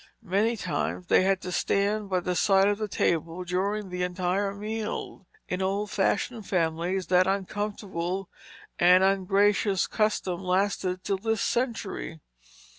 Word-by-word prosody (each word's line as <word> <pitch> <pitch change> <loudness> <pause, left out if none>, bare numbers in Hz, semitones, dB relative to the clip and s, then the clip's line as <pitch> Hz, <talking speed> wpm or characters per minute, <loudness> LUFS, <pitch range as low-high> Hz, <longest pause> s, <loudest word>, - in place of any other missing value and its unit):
Many 210 +5 +1
times 180 0 -2
they - - +4
had 190 0 +1
to 180 - -5
stand 200 +3 0
by 185 -1 +1
the 180 +1 -2
side 195 +2 +4
of 205 0 +1
the 215 - -2
table 170 -2 -1
during 195 +3 -2
the 180 0 -3
entire 180 +2 0
meal; 210 -2 -5 0.2
in 180 +1 -2
old 200 +2 -1
fashioned 205 +2 0
families 175 +1 0
that 180 0 +3
uncomfortable 195 -2 -3 0.5
and 180 +2 +6
ungracious 195 0 +2
custom 205 -5 -1
lasted 185 0 0
till 195 -1 0
this 225 0 0
century. 225 -9 -2
195 Hz, 135 wpm, -27 LUFS, 180-205 Hz, 0.5 s, and